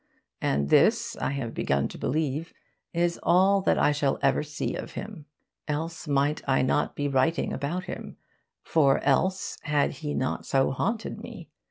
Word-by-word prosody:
And 70 +1 0
this, - - +4
I - - -1
have 125 -5 -4
begun 70 0 0
to - - -9
believe, 155 +3 -1 0.4
is 170 0 0
all 195 +3 +4
that - - +2
I - - +4
shall 145 -2 0
ever 135 -1 +3
see 150 0 -4
of - - -6
him. 195 -9 -8 0.4
Else 160 +2 -3
might 145 +1 +1
I 135 - +3
not 140 +3 +1
be 145 - -1
writing 140 +4 +1
about 150 +7 -2
him; - - -7 0.5
for 140 -4 +3
else 185 +7 +1
had 145 -1 +1
he 150 -2 -5
not 130 - -1
so 135 -1 +2
haunted 225 - -2
me. - - -10
150 Hz, 165 wpm, -27 LUFS, 135-170 Hz, 0.5 s, this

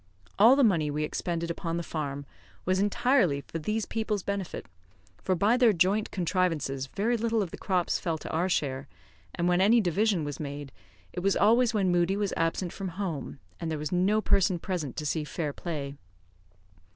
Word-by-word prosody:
All 230 +6 +8
the 280 - +4
money 170 -9 +3
we 150 +1 -1
expended 170 +2 -2
upon 170 -1 -3
the 170 - -2
farm 145 -3 -4 0.4
was 185 +1 +2
entirely 205 - +2
for 165 - -6
these 215 +6 -1
people's 215 -3 -2
benefit, 200 -3 -4 0.6
for 185 - +1
by 205 +7 +3
their 240 -4 +5
joint 195 +4 +2
contrivances 165 -7 -1
very 220 - 0
little 230 -1 +1
of 175 - -7
the - - -7
crops 180 -3 0
fell 165 -3 -2
to - - -8
our 175 +4 0
share; 135 -6 -1 0.5
and 175 0 0
when 180 +1 +3
any 220 +5 +5
division 200 -1 +1
was 145 -1 -5
made, 145 -2 -6 0.4
it - - -3
was 195 +2 +1
always 230 +3 +4
when 190 -3 +2
Moodie 175 +2 +2
was 205 -2 -1
absent 165 +2 -1
from 195 - -5
home; 165 -10 -4 0.2
and 165 - -3
there 160 - -2
was 150 0 -4
no 190 +4 +2
person 195 -3 +2
present 165 - -4
to 150 - -3
see 155 +1 -1
fair 150 -1 -3
play. 145 -5 -5
180 Hz, 190 wpm, -28 LUFS, 155-205 Hz, 0.6 s, All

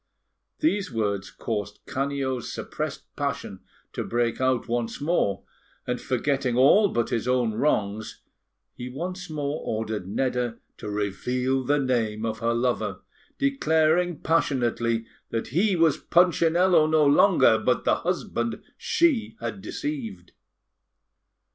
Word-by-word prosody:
These 210 -11 +1
words 100 -3 -1
caused 105 -3 -4
Canio's 135 -2 -2
suppressed - - -5
passion - - -3 0.3
to - - -3
break 120 +1 -1
out 130 -2 +1
once 120 -1 -2
more, 145 - 0 0.4
and, 125 -1 -2
forgetting 130 -1 0
all 170 +11 +6
but 120 -7 -1
his 115 +1 -1
own 125 -3 +2
wrongs, 110 -4 -1 0.5
he 125 0 -7
once 180 +6 -5
more 150 -1 -3
ordered 110 -3 -3
Nedda 125 +1 -1 0.2
to - - -6
reveal 125 +6 -1
the 145 +3 +2
name 115 -5 0
of 110 0 -3
her 115 0 0
lover, 110 -5 -1 0.4
declaring 175 - +2
passionately 120 -7 +1 0.2
that 115 - -3
he 185 - +2
was 165 -4 +3
Punchinello 175 -1 +4
no 155 -1 +4
longer, 145 +7 +5
but - - +1
the - - +3
husband - - -2 0.2
she 340 - +1
had 195 - -5
deceived. 110 - -5
130 Hz, 125 wpm, -25 LUFS, 115-160 Hz, 0.5 s, all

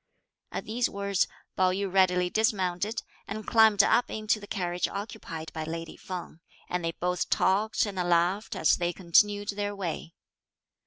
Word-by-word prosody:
At - - -4
these 235 +3 0
words, 200 -1 0 0.3
Pao 185 -1 +3
yü 195 0 -2
readily 180 -2 +4
dismounted 205 -1 0 0.2
and 215 +1 -5
climbed 220 -3 +6
up 240 +3 +3
into 215 0 0
the 205 - -11
carriage 175 -2 -1
occupied 200 -6 -6
by 160 - -3
lady 165 +1 -5
Feng; 180 -3 -7 0.3
and 180 -1 -2
they 165 0 -1
both 180 +1 -1
talked 210 +4 +2
and 200 -2 -6
laughed, 175 +3 +1
as 160 - +3
they 175 0 -1
continued 205 +4 +3
their 205 0 -2
way. 170 -3 -5
190 Hz, 155 wpm, -28 LUFS, 175-205 Hz, 0.3 s, climbed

